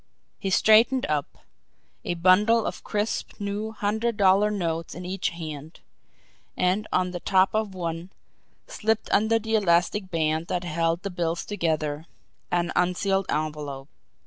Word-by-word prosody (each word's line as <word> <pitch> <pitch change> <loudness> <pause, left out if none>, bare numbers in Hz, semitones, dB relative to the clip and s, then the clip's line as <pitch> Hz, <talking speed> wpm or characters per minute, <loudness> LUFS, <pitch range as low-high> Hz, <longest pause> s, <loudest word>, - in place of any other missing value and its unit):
He 195 - -2
straightened 225 +6 +5
up, 150 -2 -3 0.6
a 175 - -2
bundle 205 +6 +4
of - - -5
crisp 210 +2 -3
new 205 +2 -3
hundred 220 +1 -1
dollar 200 +1 +4
notes 165 -5 -3
in 180 +1 -7
each 185 +1 -1
hand 155 -2 -8 0.8
and 185 +4 +1
on 180 0 +1
the 175 - -5
top 190 +1 +3
of 215 -3 -1
one, 170 0 -4 0.6
slipped 220 0 -1
under 220 +2 +3
the 225 0 -4
elastic 185 -1 +2
band 160 -1 0
that 180 - -2
held 165 +1 -1
the 200 - -3
bills 170 -1 -2
together, 160 -5 -2 0.4
an 175 0 0
unsealed 195 +2 +1
envelope. 150 -2 -3
185 Hz, 140 wpm, -25 LUFS, 165-210 Hz, 0.8 s, straightened